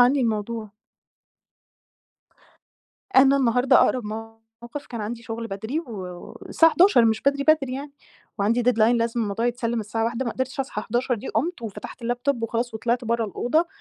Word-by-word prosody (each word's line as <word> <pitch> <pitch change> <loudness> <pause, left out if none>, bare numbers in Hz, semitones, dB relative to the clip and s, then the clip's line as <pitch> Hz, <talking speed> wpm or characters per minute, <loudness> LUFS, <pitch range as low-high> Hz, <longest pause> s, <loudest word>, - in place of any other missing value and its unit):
عني 255 +3 +5
الموضوع. 220 -1 -2 2.5
أنا 270 +1 +7
النهارده 250 -1 +3
أقرب 250 -3 +2
موقف 225 +4 -9
كان 235 -2 -6
عندي 230 +3 -5
شغل 230 0 -5
بدري 220 +9 -3
و - - -12 0.6
والساعة 325 -1 +4
11:00 340 - +5
مش 220 -1 +1
بدري 280 0 +1
بدري 305 -4 +3
يعني، 280 +1 -7 0.5
وعندي 225 +5 +2
deadline 235 -1 +3
لازم 230 0 0
الموضوع 215 +2 -1
يتسلم 235 -1 -1
الساعة 220 +2 -2
13:00، 235 +3 -2
ما 235 - -1
قدرتش 260 +1 -3
أصحى 210 -5 -4
11:00 245 +3 0
دي، 215 - -7
قُمت 310 +5 -2
وفتحت 225 +2 -8
اللاب 245 +1 -2
توب 265 -4 0
وخلاص 230 +1 -2
وطلِعت 235 +2 -1
برّه 230 0 0
الأوضة، 245 - 0
235 Hz, 160 wpm, -24 LUFS, 225-260 Hz, 2.5 s, أنا